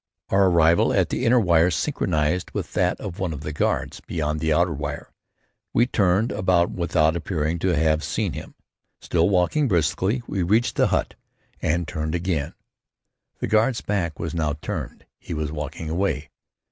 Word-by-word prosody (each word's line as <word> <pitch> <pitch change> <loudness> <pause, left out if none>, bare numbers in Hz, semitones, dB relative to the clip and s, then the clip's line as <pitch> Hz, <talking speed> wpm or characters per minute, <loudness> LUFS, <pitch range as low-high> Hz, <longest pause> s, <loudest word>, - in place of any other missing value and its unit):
Our 95 0 +4
arrival 85 -1 +4
at - - +2
the 125 - -1
inner 125 +2 +5
wire 85 -4 +4
synchronized 75 +1 0
with - - -4
that - - +1
of 90 - -6
one 90 -4 -1
of 75 - -7
the 75 0 -5
guards - - -1
beyond 75 -2 -3
the 80 +1 0
outer 85 +2 +2
wire. 75 0 -6 0.6
We 120 - +5
turned 100 -1 +2
about 90 -2 +2
without 80 -2 +1
appearing 85 -1 -2
to 90 0 +1
have 80 0 +2
seen - - -2
him. - - -8 0.4
Still 85 +1 +1
walking 100 +11 +2
briskly, 95 - +1
we 95 -4 -2
reached 105 +7 +2
the - - +3
hut - - 0 0.5
and 85 +1 0
turned 80 +1 -3
again. 85 -4 -2 0.9
The - - -1
guard's 115 +3 +2
back 85 -7 -2
was 80 0 -4
now 80 -3 0
turned; - - -5
he 85 - -6
was 75 -1 -2
walking 75 +1 -5
away. 85 -4 -1
85 Hz, 170 wpm, -23 LUFS, 80-95 Hz, 0.9 s, inner